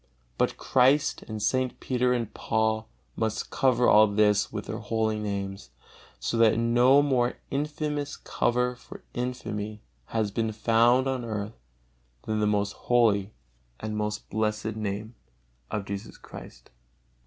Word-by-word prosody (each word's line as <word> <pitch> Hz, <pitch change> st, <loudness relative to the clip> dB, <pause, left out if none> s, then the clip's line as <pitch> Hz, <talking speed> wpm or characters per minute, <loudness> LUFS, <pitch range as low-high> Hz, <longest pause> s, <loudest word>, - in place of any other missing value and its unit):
But -, -, +1 dB
Christ 135 Hz, +3 st, +3 dB
and 110 Hz, -1 st, -5 dB
St. 130 Hz, +4 st, 0 dB
Peter 125 Hz, -1 st, +1 dB
and 120 Hz, -3 st, -1 dB
Paul 110 Hz, 0 st, 0 dB, 0.3 s
must 110 Hz, -1 st, -2 dB
cover 125 Hz, -2 st, +3 dB
all 110 Hz, +1 st, +7 dB
this 105 Hz, 0 st, +2 dB
with -, -, -5 dB
their -, -, -5 dB
holy 110 Hz, -1 st, -1 dB
names, 100 Hz, -5 st, -4 dB, 0.5 s
so 115 Hz, -, -2 dB
that 115 Hz, -1 st, +5 dB
no 120 Hz, +4 st, +5 dB
more 125 Hz, -4 st, +1 dB
infamous 150 Hz, 0 st, -2 dB
cover 125 Hz, +1 st, 0 dB
for 125 Hz, -, -13 dB
infamy 110 Hz, -4 st, -4 dB, 0.2 s
has 110 Hz, +2 st, -1 dB
been 110 Hz, +1 st, -1 dB
found 115 Hz, +4 st, +3 dB
on 130 Hz, -2 st, -1 dB
earth 105 Hz, -1 st, -4 dB, 0.7 s
than 110 Hz, 0 st, -1 dB
the 105 Hz, -, +2 dB
most 105 Hz, -1 st, +1 dB
holy 110 Hz, -4 st, +2 dB, 0.4 s
and 110 Hz, 0 st, -4 dB
most 105 Hz, 0 st, -3 dB
blessed 110 Hz, 0 st, -1 dB
Name 105 Hz, +1 st, -4 dB, 0.6 s
of 105 Hz, -2 st, -3 dB
Jesus 100 Hz, +2 st, -6 dB
Christ! -, -, -12 dB
110 Hz, 135 wpm, -27 LUFS, 105-125 Hz, 0.7 s, all